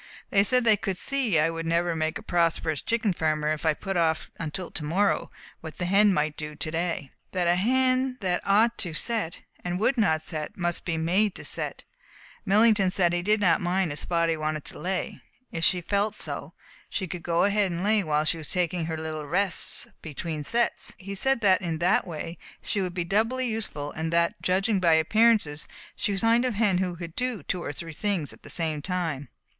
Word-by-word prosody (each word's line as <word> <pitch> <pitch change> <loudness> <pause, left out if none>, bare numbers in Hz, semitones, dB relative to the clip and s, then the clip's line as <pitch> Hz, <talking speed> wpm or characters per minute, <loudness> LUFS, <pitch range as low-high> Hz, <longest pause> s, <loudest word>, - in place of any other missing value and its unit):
They 195 -1 +5
said 250 +4 +3
they 220 -2 +5
could 190 -2 -3
see 250 -6 0
I 155 +2 +3
would 165 0 -4
never 170 +1 +1
make 160 +3 -1
a 220 - -11
prosperous 165 -5 0
chicken 225 -4 0
farmer 155 -2 0
if 155 +1 -1
I 155 - +3
put 195 +4 -4
off 160 -2 0
until 165 +2 -3
to 150 - -4
morrow 190 +7 +1 0.3
what 160 -2 -9
the 180 - -2
hen 195 +1 +4
ought 150 - +4
to 155 - -3
do 150 0 -7
to 155 - -4
day, 170 +1 -1
and 135 - -17 0.2
that 180 -2 +1
a 175 - +5
hen 255 +5 +2
that 180 -3 0
ought 220 +4 +3
to 170 -5 -2
set, 215 -1 -2 0.2
and 180 0 -2
would 245 +4 +2
not 160 -7 +2
set, 155 -2 -4
must 175 -1 -2
be 165 -2 -1
made 185 +5 +1
to - - -7
set. - - -3 0.6
Millington 205 -1 +4
said 180 -2 +2
that - - 0
he - - -1
did 210 +4 +2
not 175 -5 +3
mind 180 -1 0
if 145 - -1
Spotty 170 -1 +1
wanted 155 -1 -3
to - - -8
lay. 185 0 -3 0.3
If 165 - -3
she 180 0 +3
felt 200 +4 0
so, - - -4 0.3
she 190 - -3
could 175 0 -6
go 170 0 +1
ahead 200 -2 +2
and 170 +1 -3
lay 210 0 +3
while 155 -2 +1
she 165 - +1
was 150 -3 -6
taking 175 -1 0
her 160 -1 -3
little 155 -1 -5
rests 185 +3 +2 0.2
between 155 0 -5
sets. 235 +9 0
He 195 +1 -7
said 255 +5 +2
that 190 -3 +4
in 165 -3 -2
that 175 +3 +2
way 165 0 -6 0.2
she 200 - 0
would 180 -2 -3
be 175 - 0
doubly 225 +8 +1
useful 215 -11 -3
and 160 +1 -3
that, 170 0 +1
judging 195 +3 +1
by 170 -3 +4
appearances, 160 -2 +3 0.3
she 205 - -1
was 195 - -1
the - - 0
kind 230 +2 +4
of 250 -4 -1
hen 205 -4 +2
that 180 -2 -2
could 170 -1 -8
do 250 -3 -2
two 180 - -2
or 145 - -4
three 165 +3 -7
things 190 -4 -2
at - - -18
the - - -12
same 160 -3 -1
time. 160 -7 -3
175 Hz, 220 wpm, -26 LUFS, 160-205 Hz, 0.6 s, They